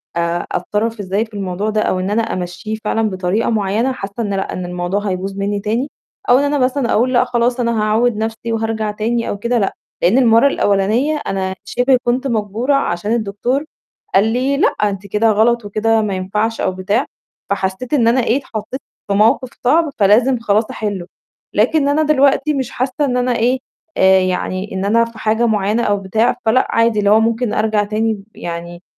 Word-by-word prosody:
آآ 170 Hz, 0 st, -1 dB
أتصرَّف 215 Hz, +5 st, -2 dB
إزاي 200 Hz, +2 st, -1 dB
في 220 Hz, -, -24 dB
الموضوع 195 Hz, +1 st, -3 dB
ده، 215 Hz, 0 st, 0 dB
أو 185 Hz, -, 0 dB
إن 185 Hz, +1 st, -2 dB
أنا 215 Hz, +3 st, +1 dB
أمشّيه 185 Hz, 0 st, -4 dB
فعلًا 225 Hz, 0 st, 0 dB
بطريقة 185 Hz, +3 st, -1 dB
معيّنة، 220 Hz, +3 st, 0 dB
حاسّة 200 Hz, -6 st, -6 dB
إن 205 Hz, -2 st, -2 dB
لأ 195 Hz, 0 st, -2 dB
إن 180 Hz, -, -4 dB
الموضوع 175 Hz, +2 st, -2 dB
هيبوظ 190 Hz, +1 st, -3 dB
مني 200 Hz, +1 st, -1 dB
تاني، 230 Hz, +7 st, -2 dB, 0.4 s
أو 245 Hz, -, +7 dB
إن -, -, +1 dB
أنا 290 Hz, 0 st, +1 dB
مثلًا 255 Hz, -1 st, +1 dB
أقول 250 Hz, +4 st, +2 dB
لأ 245 Hz, -, +4 dB
خلاص 245 Hz, 0 st, 0 dB
أنا 235 Hz, -2 st, 0 dB
هاعوِّد 220 Hz, +2 st, +2 dB
نفْسي 225 Hz, +1 st, -3 dB
وهارجَع 220 Hz, -1 st, -1 dB
تاني 230 Hz, +3 st, -2 dB
أو -, -, -3 dB
كده 235 Hz, +4 st, 0 dB
لأ، 195 Hz, -, 0 dB, 0.3 s
لإن 185 Hz, +8 st, +3 dB
المَرّة 235 Hz, 0 st, +5 dB
الأولانية 220 Hz, +6 st, +1 dB
أنا 190 Hz, -1 st, -2 dB
شِبه 250 Hz, +5 st, +2 dB
كنت 250 Hz, +3 st, 0 dB
مجبورة 225 Hz, +3 st, -1 dB
عشان 205 Hz, -5 st, -1 dB
الدكتور 235 Hz, +6 st, -1 dB, 0.5 s
قال 195 Hz, -, +5 dB
لي: 265 Hz, +3 st, 0 dB
"لأ -, -, +4 dB
أنتِ 200 Hz, -1 st, -3 dB
كده 210 Hz, +3 st, +2 dB
غلط 225 Hz, +2 st, +2 dB
وكده 220 Hz, +2 st, +1 dB
ما 210 Hz, -2 st, -2 dB
ينفعش" 210 Hz, +5 st, -2 dB
أو 190 Hz, -, +1 dB
بتاع، 200 Hz, +7 st, -1 dB, 0.4 s
فحسّيت 195 Hz, +6 st, -2 dB
إن 245 Hz, -6 st, +3 dB
أنا 245 Hz, +2 st, +3 dB
إيه 230 Hz, +2 st, +2 dB
اتحطيت 260 Hz, -1 st, -6 dB, 0.3 s
في 200 Hz, -, 0 dB
موقف 220 Hz, +5 st, +3 dB
صعب 315 Hz, +5 st, +3 dB
فلازم 230 Hz, +5 st, +4 dB
خلاص 215 Hz, -1 st, +1 dB
أحلّه، 205 Hz, -5 st, -4 dB, 0.5 s
لكن 280 Hz, +8 st, +2 dB
أنا 290 Hz, +2 st, +2 dB
دلوقتي 295 Hz, 0 st, +3 dB
مش 265 Hz, -4 st, -3 dB
حاسّة 260 Hz, +3 st, -1 dB
إن 250 Hz, -2 st, 0 dB
أنا 250 Hz, 0 st, +1 dB
إيه، 245 Hz, +3 st, +1 dB, 0.4 s
آآ 190 Hz, 0 st, +5 dB
يعني 185 Hz, +1 st, -2 dB
إن 190 Hz, +1 st, -2 dB
أنا 230 Hz, +3 st, +3 dB
في 230 Hz, -1 st, -12 dB
حاجة 220 Hz, +2 st, +1 dB
معيّنة 215 Hz, +1 st, +1 dB
أو 205 Hz, -2 st, +1 dB
بتاع، 200 Hz, +4 st, +1 dB
فلأ 230 Hz, +4 st, +3 dB
عادي 230 Hz, -1 st, +2 dB
اللي 205 Hz, -1 st, +2 dB
هو 215 Hz, +1 st, +6 dB
ممكن 230 Hz, +1 st, 0 dB
أرجَع 215 Hz, -1 st, +1 dB
تاني 215 Hz, 0 st, -1 dB
يعني 170 Hz, +1 st, -7 dB
220 Hz, 190 wpm, -17 LUFS, 200-240 Hz, 0.5 s, أو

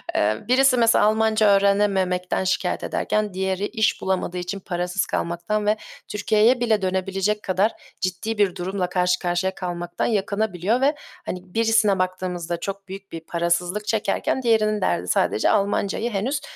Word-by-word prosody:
Eee, 105 Hz, +1 st, +2 dB
birisi 255 Hz, +1 st, +4 dB
mesela, 230 Hz, -2 st, +4 dB
Almanca 220 Hz, 0 st, +3 dB
öğrenememekten 195 Hz, -2 st, +2 dB
şikâyet 185 Hz, -, -1 dB
ederken, 210 Hz, -2 st, -1 dB
diğeri 190 Hz, +1 st, -1 dB
iş 220 Hz, -2 st, 0 dB
bulamadığı 185 Hz, -1 st, -1 dB
için 180 Hz, +3 st, -4 dB
parasız 180 Hz, 0 st, -2 dB
kalmaktan 205 Hz, +5 st, -2 dB
ve 210 Hz, +1 st, +2 dB, 0.3 s
Türkiye'ye 215 Hz, +4 st, +2 dB
bile 220 Hz, -4 st, +1 dB
dönebilecek 190 Hz, +2 st, -1 dB
kadar 190 Hz, +4 st, +1 dB, 0.3 s
ciddi 195 Hz, +4 st, -2 dB
bir 195 Hz, -3 st, +2 dB
durumla 185 Hz, 0 st, -2 dB
karşı 180 Hz, 0 st, +1 dB
karşıya 180 Hz, +1 st, -1 dB
kalmaktan 175 Hz, -1 st, -3 dB
yakınabiliyor 210 Hz, +1 st, 0 dB
ve, 290 Hz, +2 st, +3 dB, 0.3 s
hani, 180 Hz, -, -4 dB
birisine 225 Hz, -4 st, +3 dB
baktığımızda 180 Hz, -2 st, -2 dB
çok 195 Hz, +1 st, -6 dB
büyük 195 Hz, +1 st, -9 dB
bir 165 Hz, -, -5 dB
parasızlık 175 Hz, +5 st, -1 dB
çekerken, 220 Hz, +4 st, 0 dB
diğerinin 215 Hz, -3 st, +2 dB
derdi 85 Hz, -, 0 dB
sadece 105 Hz, -, +2 dB
Almancayı 205 Hz, +2 st, 0 dB
henüz 255 Hz, +8 st, -1 dB
195 Hz, 140 wpm, -23 LUFS, 180-215 Hz, 0.3 s, birisi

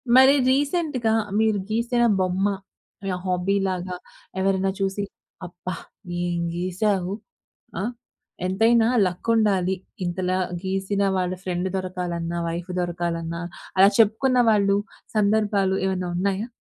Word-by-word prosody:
మరి 265 Hz, +2 st, +8 dB, 0.2 s
రీసెంట్‌గా 280 Hz, -5 st, +1 dB, 0.3 s
మీరు 220 Hz, -2 st, +2 dB
గీసిన 235 Hz, +2 st, +1 dB, 0.2 s
బొమ్మ. 185 Hz, +1 st, +1 dB, 0.6 s
యాహ్! 180 Hz, -1 st, -2 dB
హాబీ 180 Hz, +2 st, +1 dB
లాగా 180 Hz, -1 st, -3 dB, 0.4 s
ఎవరైనా 195 Hz, 0 st, +1 dB
చూసి, 195 Hz, +1 st, -1 dB, 0.4 s
అబ్బా! 180 Hz, 0 st, -6 dB, 0.5 s
ఏం 175 Hz, -1 st, -1 dB, 0.2 s
గీసావు. 185 Hz, +1 st, 0 dB, 0.7 s
ఆ! -, -, -2 dB, 0.6 s
ఎంతైనా 225 Hz, +4 st, +4 dB, 0.2 s
లక్ 180 Hz, +5 st, -3 dB
ఉండాలి, 190 Hz, -4 st, +2 dB, 0.3 s
ఇంతలా 185 Hz, +1 st, -1 dB, 0.3 s
గీసిన 195 Hz, +1 st, -1 dB, 0.2 s
వాళ్ళ 180 Hz, 0 st, 0 dB
ఫ్రెండ్ 180 Hz, 0 st, -1 dB
దొరకాలన్నా, 175 Hz, -2 st, -3 dB
వైఫ్ 170 Hz, +2 st, -5 dB
దొరకాలన్నా. 170 Hz, -1 st, -3 dB, 0.4 s
అలా 195 Hz, +1 st, +8 dB
చెప్పుకున్న 225 Hz, +4 st, +4 dB
వాళ్ళు 200 Hz, -1 st, +3 dB, 0.4 s
సందర్భాలు 205 Hz, -2 st, +2 dB
ఏమన్నా 185 Hz, -2 st, -1 dB
ఉన్నాయా? 200 Hz, +4 st, 0 dB
190 Hz, 110 wpm, -24 LUFS, 180-215 Hz, 0.7 s, మరి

